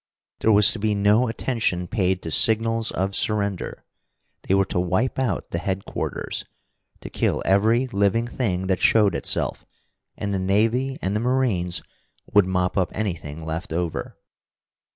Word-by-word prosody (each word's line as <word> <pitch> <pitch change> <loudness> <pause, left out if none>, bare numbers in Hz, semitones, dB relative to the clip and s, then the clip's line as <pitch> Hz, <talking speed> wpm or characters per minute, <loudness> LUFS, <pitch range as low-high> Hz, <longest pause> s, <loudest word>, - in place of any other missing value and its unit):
There 110 - +3
was 105 -1 +6
to 115 - -5
be 105 0 0
no 105 +5 +3
attention 110 -6 -1
paid 95 -2 0
to 80 - -4
signals 115 +3 +3
of 95 +1 -2
surrender. 100 -3 -1 0.6
They 95 - +1
were 95 0 +3
to 90 - -2
wipe 95 +10 0
out 120 -9 -2
the 85 - -2
headquarters, 95 +2 -3 0.6
to - - -8
kill - - 0
every 110 +6 +3
living 100 0 +1
thing 95 -7 -2
that 95 -2 0
showed 105 -4 +4
itself - - -1 0.5
and 100 -1 -3
the 95 - -1
navy 115 +8 +1
and 95 +2 -1
the - - +1
marines 115 -8 0 0.5
would 105 -3 +5
mop 90 +1 0
up 90 -4 0
anything 80 -7 -4
left 80 +2 -5
over. 85 0 -3
100 Hz, 150 wpm, -23 LUFS, 90-115 Hz, 0.6 s, was